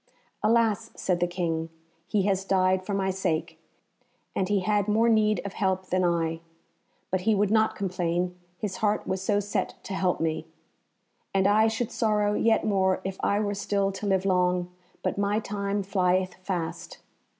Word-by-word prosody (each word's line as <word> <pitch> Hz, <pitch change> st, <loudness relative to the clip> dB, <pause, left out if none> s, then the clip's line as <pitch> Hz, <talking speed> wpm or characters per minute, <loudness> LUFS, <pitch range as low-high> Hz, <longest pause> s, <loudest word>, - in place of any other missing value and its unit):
"Alas!" 225 Hz, -1 st, +2 dB
said 180 Hz, -2 st, 0 dB
the 175 Hz, -, +2 dB
King, 165 Hz, -2 st, -2 dB, 0.4 s
"he 200 Hz, 0 st, +1 dB
has 195 Hz, -1 st, +1 dB
died 185 Hz, -1 st, +2 dB
for 200 Hz, +1 st, -2 dB
my 190 Hz, -1 st, +1 dB
sake, 165 Hz, -3 st, -2 dB, 0.8 s
and 190 Hz, 0 st, 0 dB
he 205 Hz, -2 st, +2 dB
had 205 Hz, +1 st, +1 dB
more 220 Hz, +2 st, +3 dB
need 215 Hz, -2 st, +3 dB
of 200 Hz, -, -5 dB
help 190 Hz, -1 st, -1 dB
than 185 Hz, 0 st, +2 dB
I. 165 Hz, -2 st, +1 dB, 0.7 s
But 185 Hz, 0 st, +1 dB
he 220 Hz, +3 st, +2 dB
would 205 Hz, 0 st, +2 dB
not 220 Hz, 0 st, +3 dB
complain, 180 Hz, -2 st, -1 dB, 0.2 s
his 200 Hz, -1 st, -4 dB
heart 210 Hz, 0 st, 0 dB
was 190 Hz, 0 st, -2 dB
so 205 Hz, +1 st, +1 dB
set 205 Hz, 0 st, -2 dB
to 195 Hz, -, -6 dB
help 185 Hz, -2 st, 0 dB
me. 160 Hz, -1 st, -1 dB, 0.9 s
And 190 Hz, -1 st, +3 dB
I 215 Hz, +2 st, +5 dB
should 225 Hz, +1 st, -2 dB
sorrow 210 Hz, -2 st, +1 dB
yet 225 Hz, +1 st, +2 dB
more 190 Hz, -2 st, +2 dB
if 190 Hz, 0 st, -4 dB
I 200 Hz, -, +2 dB
were 205 Hz, -1 st, -1 dB
still 200 Hz, -1 st, 0 dB
to 200 Hz, +2 st, -5 dB
live 190 Hz, -1 st, +1 dB
long, 180 Hz, -1 st, +1 dB, 0.3 s
but -, -, -1 dB
my 205 Hz, +1 st, +1 dB
time 200 Hz, -1 st, -2 dB
flieth 185 Hz, -1 st, +1 dB
fast. 180 Hz, -4 st, -4 dB
195 Hz, 170 wpm, -27 LUFS, 180-205 Hz, 0.9 s, I